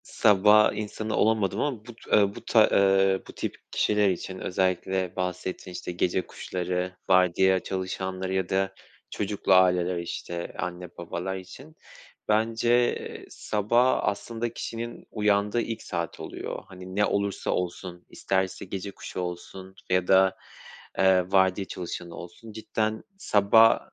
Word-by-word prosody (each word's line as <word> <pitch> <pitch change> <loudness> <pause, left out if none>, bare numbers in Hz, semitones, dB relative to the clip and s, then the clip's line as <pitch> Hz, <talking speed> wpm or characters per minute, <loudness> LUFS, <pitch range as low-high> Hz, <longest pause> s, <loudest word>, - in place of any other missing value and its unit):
Sabah 105 +1 +5
insanı 110 +1 -4
olamadım 105 -2 +2
ama 125 -7 -2
bu 120 - -10
t 100 -3 +2
bu - - -10
ta 110 -2 +5
eee, 95 -1 +4
bu - - -10
tip - - -4 0.2
kişiler 105 -1 +2
için 95 +1 -4
özellikle 95 0 -1
bahsettin, 90 0 -4
işte, 90 0 -5
gece 90 +1 0
kuşları, 90 0 -3
vardiya 95 0 +4
çalışanları 95 0 -4
ya 95 -1 -1
da 95 0 0 0.4
çocuklu 100 -1 0
aileler, 90 -1 +4
işte, 85 0 -5
anne 90 0 -4
babalar 85 +2 -4
için. 130 +12 -11 0.5
Bence 115 +3 +1
sabah 115 +5 +1
aslında 115 +3 -2
kişinin 115 +1 -6
uyandığı 105 +1 +1
ilk 115 -1 -4
saat 85 -1 -4
oluyor. - - -6
Hani 95 0 -10
ne 105 +1 +3
olursa 100 -1 -1
olsun 90 0 -4
isterse 95 0 -2
gece 95 +1 -5
kuşu 95 - -8
olsun 90 +2 -6
f - - -1
ya 90 -1 +2
da, 95 0 +5 0.6
eee, 95 -1 +4
vardiya 95 0 +3
çalışanı 85 -1 -6
olsun. 90 +6 -10
Cidden 110 0 -2
sabah, 110 - +5
95 Hz, 135 wpm, -26 LUFS, 90-105 Hz, 0.6 s, Sabah